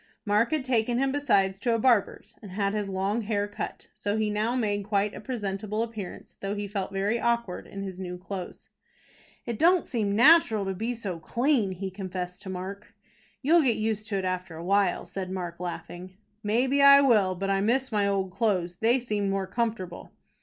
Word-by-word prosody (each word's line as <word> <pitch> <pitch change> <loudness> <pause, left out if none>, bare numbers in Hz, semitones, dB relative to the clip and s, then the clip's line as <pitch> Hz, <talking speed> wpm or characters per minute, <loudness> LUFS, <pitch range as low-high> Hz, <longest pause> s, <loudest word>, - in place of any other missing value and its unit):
Mark 210 +3 +3
had 310 -3 0
taken 240 -2 +1
him 270 +1 +1
besides 200 -9 +2
to 235 +2 +1
a - - +2
barber's 225 -3 +1
and 200 -4 -10
had 200 0 0
his 210 -2 -2
long 195 +4 -1
hair 205 -1 -1
cut. 205 - -6
So 205 +1 -2
he 215 -1 0
now 215 +4 0
made 205 -4 0
quite 205 0 0
a - - -8
presentable 210 -2 -3
appearance, 220 -5 -8
though 195 +1 -2
he 205 0 -3
felt 195 -1 -3
very 200 +4 0
awkward 235 -6 -1
in 195 0 -6
his 190 -2 -6
new 180 -1 -5
clothes. 185 0 -7 0.8
"It 235 -3 -4
don't 350 +1 +4
seem 210 -5 -1
natural 230 -4 +6
to 195 - -2
be 225 +6 -3 0.3
clean," 235 - +1
he 190 +1 -5
confessed 185 -2 -5
to 190 - -8
Mark. 190 +2 -7 0.5
"You'll 330 +5 +5
get 255 -6 +2
used 215 0 -2
to 200 - -1
it 190 - -2
after 180 -2 -3
a 165 - -7
while," 195 -1 +2
said 190 -1 -5
Mark, 175 -2 -5
laughing. 180 +1 -7 0.2
"Maybe 250 +7 +2
I 280 0 +9
will; 210 -9 +4
but 195 +2 -2
I 195 0 +2
miss 255 +5 +1
my 205 -2 +2
old 195 -2 0
clothes. 185 -4 0
They 235 +3 +3
seemed 210 -5 -1
more 195 0 -1
comfortable." 200 -4 -3
205 Hz, 195 wpm, -27 LUFS, 190-235 Hz, 0.8 s, I